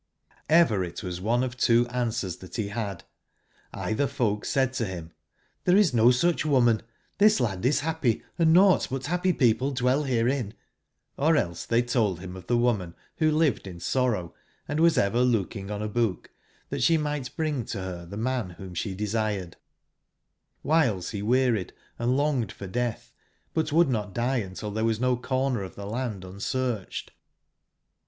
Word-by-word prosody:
'BRit 110 - +3
wasoneof 115 +8 -1
two 120 -1 +3
answers 115 -7 -2
that 90 -2 -11
he 105 -3 -2
had: 100 -4 -4 0.7
either 125 +6 0
folk 115 -7 -1
said 130 -2 +1
to 130 - -1
him: 85 -3 -7 0.6
'^XThere 180 +2 +6
is 205 -9 +4
no 115 0 +6
such 160 +8 +2
woman; 125 -7 +3 0.4
this 210 +1 +5
landis 120 +5 +1
happy, 155 -7 0 0.2
and 160 -1 +5
nought 185 +2 +5
but 135 0 -3
happy 180 +4 +1
people 130 -3 +2
dwell 130 +1 +1
herein;" 125 -3 0 0.6
or 155 +3 +3
else 85 - -2
they 115 +1 +3
told 110 -7 0
him 90 0 -8
of 90 -1 -11
the 120 - +2
woman 105 -8 0 0.2
who 155 -1 +3
lived 155 -9 +1
in 90 -2 -8
sorrow, 115 -7 0 0.2
& - - -40
was 160 +3 +3
ever 100 +4 +2
look 115 -7 +1
ing 100 -1 -6
on 105 0 -3
a - - -1
book, 105 -4 -1 0.4
that - - -3
she 160 +7 +4
might 150 -4 -3
bring 155 -6 -1
to - - -5
her 95 -2 -5
the 95 +4 -8
man 120 -3 -1
whom 95 -2 -9
she 95 +2 -3
desired 105 -3 -2 1.1
j!^ 145 - -3 0.2
OCIhiles 95 -6 -3
he 105 -3 -4
wearied 120 -3 +1 0.3
and 120 +2 +1
long 145 -3 +2
ed 110 - -5
for 100 - -9
death, 120 +4 -3 0.4
but 160 -1 0
would 165 +2 +5
not 105 -5 -2
die 125 +3 +1
until 105 0 -4
there 110 +2 -2
was 115 -1 +1
no 125 0 +2
comer 130 -1 -1
of 95 - -7
the 100 - -7
land 110 -3 -4
unsearched. 105 +3 -3
120 Hz, 170 wpm, -26 LUFS, 100-135 Hz, 1.1 s, ^XThere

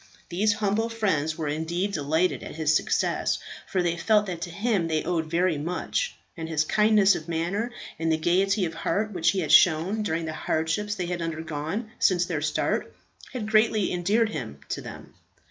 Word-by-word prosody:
These 205 +4 +2
humble 210 +2 0
friends 165 -9 0
were 160 -2 -3
indeed 165 +6 -1
delighted 160 +3 +1
at - - -8
his 155 -1 +2
success, - - +1 0.3
for 185 -2 0
they 170 -1 0
felt 210 +4 +3
that 175 -4 -5
to 175 - -4
him 200 -1 0
they 155 -1 0
owed 165 -3 -1
very 170 -2 +1
much; 180 - -2 0.2
and 160 -1 -6
his 155 -1 +2
kindness 210 +2 +4
of 160 - -5
manner 175 +8 -1 0.3
and 165 0 +1
the 160 - +2
gaiety 190 +4 +2
of 165 - -4
heart 215 +5 -1
which 170 -2 +2
he 195 - +1
had 155 - -2
shown 180 +6 +5
during 165 -5 -1
the 160 - -4
hardships 165 +7 -1
they 180 - -3
had 175 0 -3
undergone 160 +6 -4
since 180 -2 +3
their 165 -4 -2
start, 155 0 -1 0.4
had 215 -5 -4
greatly 215 -2 +3
endeared 205 +6 +2
him 115 - -6
to - - -3
them. - - -10
175 Hz, 185 wpm, -26 LUFS, 160-210 Hz, 0.4 s, shown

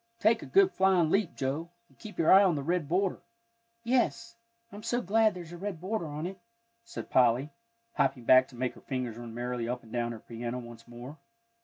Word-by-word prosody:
Take 225 +1 +3
a - - -8
good 390 -1 +5
flying 185 - +3
leap, 195 -4 +1
Joe, 140 +5 -3 0.2
and - - -28
keep 215 -1 -10
your 165 - +5
eye 195 +1 +8
on 185 -4 +3
the 140 - -3
red 170 -1 -1
border." 185 +2 0 0.6
"Yes; 230 -1 0 0.4
I'm 205 - -9
so 240 +3 -1
glad 215 0 +2
there's 175 -2 -9
a 175 - -8
red 190 -2 -5
border 185 -1 -3
on 150 +2 -5
it," 190 +1 -6 0.4
said 230 0 -8
Polly, 125 +3 +3 0.4
hopping 120 -3 0
back 130 +1 +6
to 125 - -15
make 125 +1 -2
her - - -16
fingers 125 -4 -4
run 120 -1 -8
merrily 120 -1 -3
up 125 0 -3
and 110 - -15
down 120 -1 -1
her 115 - -9
piano 120 +2 -5
once 120 -2 -10
more. 120 +6 -10
160 Hz, 210 wpm, -29 LUFS, 125-195 Hz, 0.6 s, eye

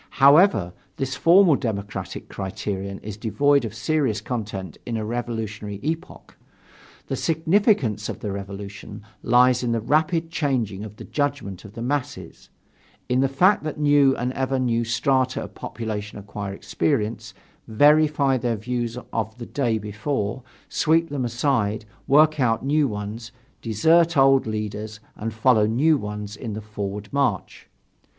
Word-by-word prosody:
However, 140 - +5 0.2
this 135 -1 -2
formal 175 0 +6
democratic 105 -6 -4
criterion 95 0 -4
is 105 -1 -6
devoid 140 +5 +2
of 110 - -6
serious 130 -3 0
content 105 -6 -5
in 115 -2 -3
a 110 - -3
revolutionary 110 -3 -4
epoch. 165 +4 -5 0.7
The - - -3
significance 160 - +1
of - - -5
the 105 - -4
Revolution 100 +1 -7 0.2
lies 125 +1 +4
in 120 -2 0
the 115 - +1
rapid 160 +7 +1
changing 120 - -1
of 105 -1 -9
the - - -10
judgment 140 - -3
of 105 - -11
the 115 - -6
masses, 130 - -4 0.6
in 125 +1 +2
the 135 - +3
fact 180 +9 +3
that 155 -1 -4
new 145 -2 +4
and 125 +2 -2
ever 135 0 -1
new 120 -2 +1
strata 130 +3 +1
of - - -10
population 105 -2 -5
acquire 100 0 -6
experience, 105 -3 -2 0.3
verify 145 +2 +4
their 120 -1 -1
views 120 +2 -3 0.2
of 110 0 -2
the 120 - -7
day 120 -5 0
before, 105 +3 -3 0.3
sweep 165 +1 +2
them 140 -3 -2
aside, 120 -3 0 0.2
work 155 +2 +5
out 120 -1 +1
new 145 +1 +2
ones, 105 +1 -6 0.3
desert 160 +9 +3
old 135 -2 +5
leaders 110 0 -4 0.2
and 115 +2 -4
follow 110 -1 +3
new 145 +8 +3
ones 105 -4 -5
in 110 0 -6
the 110 - -5
forward 105 -1 -5
march. 135 -9 -1
120 Hz, 145 wpm, -23 LUFS, 105-140 Hz, 0.7 s, formal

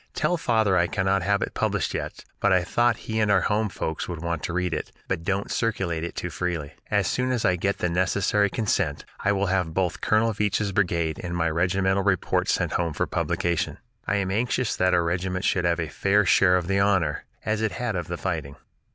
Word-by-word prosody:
Tell 175 - +1
father 110 - +2
I 85 0 +3
cannot 95 +1 +1
have 100 +2 +1
it - - -5
published - - -1
yet, - - -5
but 100 - +2
I 90 -1 +4
thought 120 +6 +2
he 110 0 -2
and 105 -1 +2
our 100 -2 +4
home 105 +2 +1
folks 80 -3 -4
would 85 -2 -4
want 85 -2 -2
to - - -3
read 90 -1 0
it, - - -4 0.2
but 90 -3 -2
don't 100 +3 -1
circulate 95 -8 -1
it 85 - -5
too 90 - -4
freely. 80 -2 -3 0.2
As - - +2
soon 125 0 0
as 125 -3 0
I 90 - +4
can 90 - -3
get 100 +2 0
the - - 0
necessary 95 +3 +1
consent, 95 -8 -1
I 105 - +1
will 100 0 +1
have 90 -4 0
both 90 -2 0
Colonel 110 +1 +2
Veatch's 105 0 0
brigade 85 -5 0
and 90 -1 -3
my 85 -1 +1
regimental 95 +3 +1
reports 95 -3 +1
sent - - 0
home 85 -2 -1
for - - 0
publication. 85 +1 -1 0.3
I 105 - +1
am 95 -2 0
anxious 120 +3 0
that 90 0 +2
our 85 - +3
regiment 90 +2 -1
should 90 -2 +1
have 85 0 +1
a 80 - -1
fair 100 +5 +2
share 90 0 +5
of 90 - -2
the 95 +2 +1
honor, 95 -7 +1 0.2
as 110 0 0
it 110 -4 0
had 120 0 -2
of 85 -2 -3
the 90 - -4
fighting. 80 -7 -3
95 Hz, 225 wpm, -25 LUFS, 85-100 Hz, 0.3 s, share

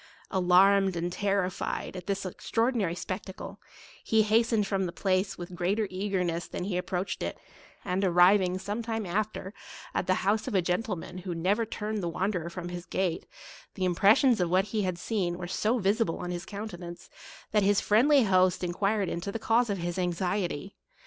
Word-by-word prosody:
Alarmed 190 +1 +4
and 170 +1 -2
terrified 195 -2 -1
at 180 0 -8
this 200 -1 -2
extraordinary 225 -1 0
spectacle, 185 +1 -6 0.4
he 220 -1 +3
hastened 220 0 +2
from 195 -2 0
the - - -5
place 190 +1 0
with 175 0 -8
greater 190 +5 0
eagerness 185 -3 -1
than - - -5
he 190 -1 -2
approached 180 +1 -2
it; - - -3 0.5
and 190 +1 0
arriving, 180 +1 +4
some 205 +4 -4
time 225 -2 -3
after, 200 +1 -2 0.4
at 180 - -1
the 185 - +3
house 210 +2 +1
of - - -2
a 190 - +4
gentleman 180 0 -2
who 180 -1 -5
never 200 +7 +1
turned 215 -1 -3
the 170 - -2
wanderer 180 -1 -2
from 175 0 -6
his 175 0 -7
gate, 185 -3 -1 0.5
the 185 - -1
impressions 200 +6 +4
of 175 - +1
what 185 +2 +3
he 215 - +1
had 185 -3 -1
seen 180 -2 -2
were 180 - -5
so 215 +7 0
visible 205 -2 +1
on 180 0 -4
his 175 +1 -5
countenance, 185 -5 -7 0.4
that 210 - +3
his 200 0 +3
friendly 260 +6 +4
host 185 -3 +3
enquired 195 +3 0
into 170 +4 -3
the 225 - -3
cause 225 +1 +2
of 200 - 0
his 175 +1 -3
anxiety. 180 0 -2
190 Hz, 175 wpm, -28 LUFS, 180-210 Hz, 0.5 s, Alarmed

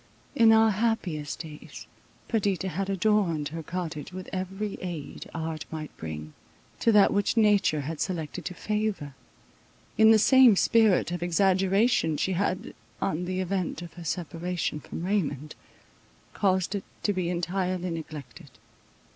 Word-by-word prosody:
In 230 -4 +6
our 220 0 +6
happiest 195 -9 -1
days, 155 -3 -10 0.4
Perdita 195 -5 0
had 190 +3 -3
adorned 190 -6 +1
her 165 +1 -6
cottage 165 -1 -5
with 185 0 -7
every 195 +2 -4
aid 170 -6 -6
art 160 -2 -4
might 155 -1 -7
bring, 75 -1 -7 0.5
to 230 - +3
that 210 -2 +5
which 205 +3 +1
nature 205 -8 +3
had 155 +2 -5
selected 160 -5 -3
to 180 - -5
favour. 210 -10 -2 0.9
In 220 0 +8
the 220 - +7
same 250 0 +7
spirit 215 -3 +3
of 175 -1 -3
exaggeration 190 0 +2
she 190 - 0
had, 185 0 -1 0.3
on 170 +4 -1
the 185 +1 -2
event 185 -2 -2
of 170 -2 -10
her 175 - -10
separation 170 -1 -3
from 165 - -7
Raymond, 155 -7 -1 0.8
caused 190 -1 +1
it 200 - -3 0.2
to 205 - +2
be 185 -2 -1
entirely 180 +1 -1
neglected. 155 -4 -8
185 Hz, 140 wpm, -27 LUFS, 160-205 Hz, 0.9 s, In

